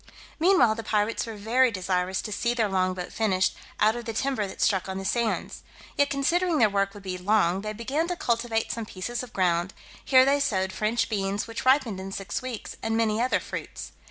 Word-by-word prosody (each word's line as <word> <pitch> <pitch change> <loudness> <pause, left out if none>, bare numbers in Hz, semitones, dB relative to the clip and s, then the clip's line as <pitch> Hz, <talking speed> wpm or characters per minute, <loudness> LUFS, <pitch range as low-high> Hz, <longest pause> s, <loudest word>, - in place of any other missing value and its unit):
Meanwhile 315 - +5
the 225 +1 -6
pirates 210 +2 0
were 225 - -6
very 235 +5 +3
desirous 185 -2 -1
to 215 - -5
see 235 +3 0
their 225 -3 +2
long 185 -1 0
boat 180 -1 -6
finished 190 -4 +1 0.2
out 215 +2 +4
of 240 -1 -6
the 225 - -4
timber 240 -3 -1
that 190 - -10
struck 190 -2 +1
on 190 - -3
the 195 - -5
sands; 230 +2 -1 0.3
yet 285 0 +3
considering 335 +5 +1
their 220 -5 +4
work 200 0 0
would 205 - -11
be 185 -1 -4
long, 190 -1 +2
they 215 +1 -4
began 265 +10 -2
to 355 - -2
cultivate 230 -5 -1
some 230 -2 -4
pieces 215 +6 -4
of 250 -3 -9
ground; 180 0 0 0.3
here 260 -1 +6
they 280 +1 +3
sowed 190 -9 0
French 215 +4 0
beans, 200 -1 -1
which 230 +1 -6
ripened 260 -7 +3
in 190 +1 -6
six 195 -3 -4
weeks, 250 -4 -6
and 225 0 -1
many 225 -1 +1
other 255 +1 +2
fruits. - - -7
220 Hz, 215 wpm, -26 LUFS, 195-240 Hz, 0.3 s, here